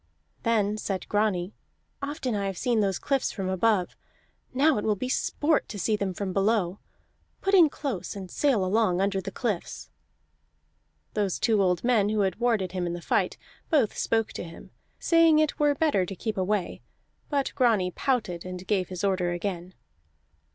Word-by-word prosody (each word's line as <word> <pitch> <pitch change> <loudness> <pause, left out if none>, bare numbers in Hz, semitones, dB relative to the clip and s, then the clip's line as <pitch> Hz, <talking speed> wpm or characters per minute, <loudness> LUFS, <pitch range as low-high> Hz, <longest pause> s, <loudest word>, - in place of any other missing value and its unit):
Then 215 -3 +1
said 195 -3 -3
Grani: 205 -3 0 0.5
"Often 280 -3 -3
have 205 - -1
I 195 - -1
seen 230 +5 0
these 195 -3 +1
cliffs 275 -2 0
from 195 -3 -4
above; 190 -1 +1 0.6
now 275 -1 +3
it - - -4
will 215 -1 +1
be 255 +6 -4
sport 295 +3 0
to 210 - -6
see 215 +3 +1
them 200 -2 -2
from 195 -1 -3
below. 195 -2 +1 0.6
Put 390 - 0
in 345 -5 +7
close, 270 - -4
and 190 -2 -8
sail 255 -10 +2
along 185 -2 +2
under 195 0 +1
the 195 - -5
cliffs." 205 -3 -4 1.2
Those 200 -4 0
two 220 -3 +2
old 180 -2 +1
men 230 -5 +3
who 215 -1 +1
had 190 -2 0
warded 225 -7 +1
him 180 -2 -2
in 170 - -3
the 175 - -4
fight - - 0 0.3
both 280 - +2
spoke 225 -1 0
to - - -5
him, 165 -1 -11 0.3
saying 330 -2 +4
it 310 0 +1
were 295 -1 +3
better 290 -11 +2
to 195 - -6
keep 215 +3 -3
away. 190 -1 -1 0.5
But 280 -2 0
Grani 215 -8 +2
pouted 215 -8 -1
and 185 0 -7
gave 190 -2 0
his 185 0 -5
order 185 -3 +1
again. 180 0 -4
205 Hz, 175 wpm, -27 LUFS, 185-245 Hz, 1.2 s, in